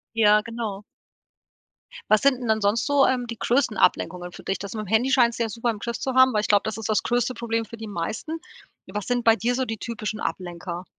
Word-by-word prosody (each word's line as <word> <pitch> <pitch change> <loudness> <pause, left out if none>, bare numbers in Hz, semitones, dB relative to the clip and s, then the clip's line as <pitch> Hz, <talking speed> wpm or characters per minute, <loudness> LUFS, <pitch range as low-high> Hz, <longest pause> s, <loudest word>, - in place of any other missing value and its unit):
Ja, 210 -1 +5
genau. 225 -4 -5 1.3
Was 215 - +6
sind 265 -2 +3
'n 240 - -4
dann 220 0 +2
sonst 210 +5 +1
so, 285 -1 +4
ähm, 250 -2 0
die 230 -1 -6
größten 240 -2 +1
Ablenkungen 180 -1 +1
für - - -12
dich? 195 - -2
Das 200 -1 -7
mit'm 215 -3 -5
Handy 230 +5 +2
scheinst 240 -3 +4
du 235 - +1
ja 225 - -2
super 230 +2 -2
im 220 - -1
Griff 235 +3 -4
zu 265 -1 -3
haben, 260 -1 +6
weil 210 - +2
ich - - -3
glaube, 205 -1 +4
das 220 - -3
ist 220 - -5
das 215 - +2
größte 245 +1 0
Problem 230 -1 -2
für 230 - -10
die 220 -1 -7
meisten. 215 - -4 0.5
Was 210 -1 -5
sind 245 -1 0
bei 225 -1 +6
dir 240 +2 0
so 260 +1 0
die 225 -1 -4
typischen 215 -2 -5
Ablenker? 175 0 -5
225 Hz, 240 wpm, -24 LUFS, 210-240 Hz, 1.3 s, Was